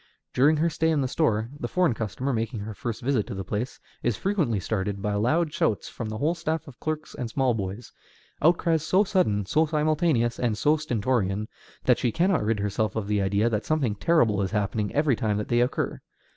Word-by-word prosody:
During 145 Hz, +5 st, +4 dB
her 165 Hz, +3 st, +2 dB
stay 160 Hz, +2 st, +1 dB
in 155 Hz, -3 st, +2 dB
the 130 Hz, -, 0 dB
store, 115 Hz, -6 st, 0 dB
the -, -, -3 dB
foreign 180 Hz, -7 st, +2 dB
customer, 115 Hz, +5 st, -3 dB
making 115 Hz, -1 st, -2 dB
her 110 Hz, +1 st, -5 dB
first 115 Hz, +3 st, -5 dB
visit 125 Hz, -5 st, +1 dB
to -, -, -5 dB
the 95 Hz, -, -4 dB
place, 110 Hz, +7 st, -4 dB, 0.2 s
is 120 Hz, -4 st, 0 dB
frequently 170 Hz, -, 0 dB
startled 100 Hz, +1 st, -2 dB
by 105 Hz, +1 st, -1 dB
loud 150 Hz, +10 st, +1 dB
shouts 105 Hz, -, 0 dB
from 115 Hz, -, -5 dB
the 110 Hz, -, -4 dB
whole 150 Hz, +8 st, +1 dB
staff 160 Hz, -2 st, -3 dB
of 130 Hz, -4 st, -13 dB
clerks 155 Hz, 0 st, -4 dB
and 120 Hz, -3 st, -4 dB
small 130 Hz, +1 st, +1 dB
boys, 100 Hz, +2 st, -5 dB, 0.5 s
outcries 165 Hz, -1 st, +3 dB
so 185 Hz, +5 st, +3 dB
sudden, 145 Hz, -, +1 dB
so 155 Hz, +11 st, +2 dB
simultaneous, 150 Hz, -5 st, +1 dB
and 115 Hz, -4 st, 0 dB
so 150 Hz, +8 st, +3 dB
stentorian, 110 Hz, -7 st, -1 dB, 0.4 s
that -, -, +3 dB
she 120 Hz, -, +1 dB
cannot 175 Hz, -, +2 dB
rid 110 Hz, 0 st, 0 dB
herself 105 Hz, 0 st, -1 dB
of 110 Hz, -3 st, -2 dB
the 105 Hz, -1 st, +1 dB
idea 100 Hz, +3 st, +2 dB
that 110 Hz, -2 st, 0 dB
something 145 Hz, -8 st, +1 dB
terrible 110 Hz, -4 st, +2 dB
is 95 Hz, -, -1 dB
happening 105 Hz, 0 st, -1 dB
every 145 Hz, -3 st, +3 dB
time 105 Hz, -2 st, 0 dB
that 105 Hz, -, -4 dB
they 120 Hz, 0 st, +3 dB
occur. 125 Hz, -, -1 dB
120 Hz, 210 wpm, -26 LUFS, 105-155 Hz, 0.5 s, During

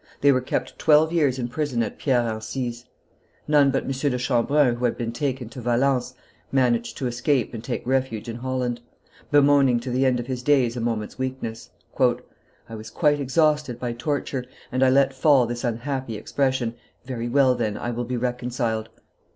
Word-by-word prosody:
They 140 Hz, -, +6 dB
were 130 Hz, -1 st, +2 dB
kept 125 Hz, -, -3 dB
twelve 155 Hz, +1 st, +4 dB
years 145 Hz, -6 st, +2 dB
in 120 Hz, -2 st, -2 dB
prison 130 Hz, -3 st, -1 dB
at 110 Hz, -, -6 dB
Pierre 125 Hz, -4 st, +2 dB
Encise; 120 Hz, +2 st, -4 dB, 0.6 s
none 145 Hz, -2 st, +5 dB
but 135 Hz, 0 st, 0 dB
M. -, -, -4 dB
de 135 Hz, -1 st, 0 dB
Chambrun, 125 Hz, +2 st, +2 dB
who 125 Hz, -, -1 dB
had 120 Hz, -, 0 dB
been 115 Hz, -1 st, -3 dB
taken 130 Hz, 0 st, -3 dB
to 125 Hz, +2 st, -9 dB
Valence, 125 Hz, +1 st, +1 dB, 0.4 s
managed 120 Hz, -3 st, +1 dB
to 135 Hz, -, -3 dB
escape 120 Hz, +1 st, 0 dB
and 115 Hz, -1 st, -6 dB
take 125 Hz, 0 st, -4 dB
refuge 130 Hz, -3 st, -1 dB
in 115 Hz, 0 st, -5 dB
Holland, 125 Hz, -1 st, -2 dB, 0.5 s
bemoaning 140 Hz, -4 st, +4 dB
to 125 Hz, -, -5 dB
the 130 Hz, +2 st, +2 dB
end 125 Hz, -1 st, +1 dB
of 120 Hz, -, -4 dB
his 125 Hz, -1 st, -4 dB
days 125 Hz, -3 st, +2 dB
a 120 Hz, -, -3 dB
moment's 115 Hz, 0 st, -3 dB
weakness. 130 Hz, -4 st, -4 dB, 0.3 s
"I 115 Hz, -, -2 dB
was 110 Hz, 0 st, -8 dB
quite 145 Hz, +3 st, +2 dB
exhausted 150 Hz, -2 st, +1 dB
by 120 Hz, -1 st, -3 dB
torture, 135 Hz, 0 st, -3 dB, 0.3 s
and 130 Hz, +1 st, -1 dB
I 130 Hz, -, +5 dB
let 135 Hz, +1 st, +3 dB
fall 135 Hz, -1 st, +4 dB
this 120 Hz, +1 st, -5 dB
unhappy 120 Hz, 0 st, -3 dB
expression: 130 Hz, 0 st, -1 dB, 0.3 s
'Very 120 Hz, -2 st, -4 dB
well, 130 Hz, 0 st, +4 dB
then, 110 Hz, -4 st, -2 dB
I 120 Hz, -, -3 dB
will 120 Hz, +1 st, -3 dB
be 125 Hz, +1 st, -3 dB
reconciled. 120 Hz, -2 st, -2 dB
125 Hz, 185 wpm, -24 LUFS, 120-135 Hz, 0.6 s, They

